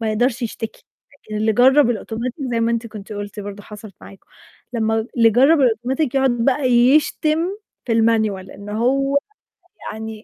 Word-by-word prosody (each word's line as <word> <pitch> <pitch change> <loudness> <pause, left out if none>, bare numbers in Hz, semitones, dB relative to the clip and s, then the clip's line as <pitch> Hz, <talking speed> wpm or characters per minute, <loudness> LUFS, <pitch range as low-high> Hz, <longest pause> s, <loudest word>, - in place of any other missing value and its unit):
ما 220 -1 -1
يقدرش 240 +3 0
يشتكي، 225 -1 -6 0.3
لكن 215 -6 -9
اللي 220 +1 +1
جرب 260 +3 +5
الأوتوماتيك 235 +1 -4 0.2
زي 230 - 0
ما 230 0 +1
أنت 230 0 -2
كنتِ 215 -1 -10
قُلتِ 205 0 -6
برضه 205 0 -8
حصلت 210 -1 -12
معاكم، 195 - -15 0.5
لمّا 225 -1 0
اللي 230 -1 +5
جرب 275 +7 +4
الأوتوماتيك 255 +3 0
يقعد 270 -1 +3
بقى 250 +4 0
يشتم 295 +5 +3 0.5
في 235 - -2
المانيوال 220 -4 +1
إن 200 +1 -11
هو 270 +6 +1 0.8
يعني 220 0 -8
230 Hz, 160 wpm, -20 LUFS, 215-255 Hz, 0.8 s, جرب